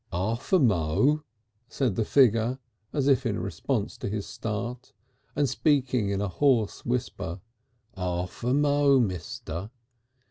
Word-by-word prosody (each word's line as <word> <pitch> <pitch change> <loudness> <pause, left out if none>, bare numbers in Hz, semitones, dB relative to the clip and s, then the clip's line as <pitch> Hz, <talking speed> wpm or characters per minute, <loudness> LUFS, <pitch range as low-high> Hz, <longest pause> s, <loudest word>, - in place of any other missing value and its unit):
"Arf 95 +7 -2
a 190 - +7
mo'," 120 - +2 0.5
said 130 -7 0
the 110 - +1
figure, 120 0 +3 0.3
as 140 -2 0
if 135 -4 +4
in - - -1
response - - -3
to - - -3
his 105 -1 -3
start, 120 +4 -5 0.4
and 145 0 +2
speaking 130 -5 +1
in 100 0 -1
a 105 - 0
hoarse 120 0 +1
whisper. 115 -8 -3 0.5
"Arf 90 +2 -4
a 125 - +1
mo', 145 -1 +4
mister. 90 -2 -3
115 Hz, 135 wpm, -27 LUFS, 100-135 Hz, 0.5 s, a